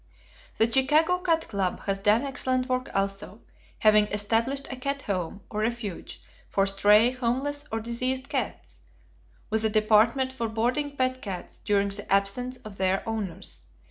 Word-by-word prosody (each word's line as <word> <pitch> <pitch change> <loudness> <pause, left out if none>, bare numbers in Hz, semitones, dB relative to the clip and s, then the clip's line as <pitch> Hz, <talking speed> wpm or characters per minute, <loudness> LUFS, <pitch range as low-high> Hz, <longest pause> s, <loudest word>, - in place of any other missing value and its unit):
The 225 - +5
Chicago 305 +8 +4
Cat 330 -3 0
Club 195 -4 -2
has 195 -1 -2
done 210 +4 +3
excellent 255 -2 -1
work 255 0 -1
also, 195 +2 -2 0.4
having 215 -1 +5
established 225 +7 0
a - - -3
cat 275 +2 -3
home, 190 0 -3
or 210 - -3
refuge, 220 -4 -4 0.3
for 195 - +2
stray, 210 +4 +5
homeless, 265 +4 -1
or 225 - -1
diseased 255 +4 -1
cats, 90 - -4 0.7
with 220 0 +1
a 220 - +3
department 220 +5 +3
for 235 -3 -3
boarding 255 +6 -1
pet 255 0 0
cats 190 -4 -6
during 200 -1 +1
the 200 0 -5
absence 200 +6 +1
of 205 -2 -8
their 190 +4 0
owners. 200 -5 -3
225 Hz, 150 wpm, -26 LUFS, 200-260 Hz, 0.7 s, The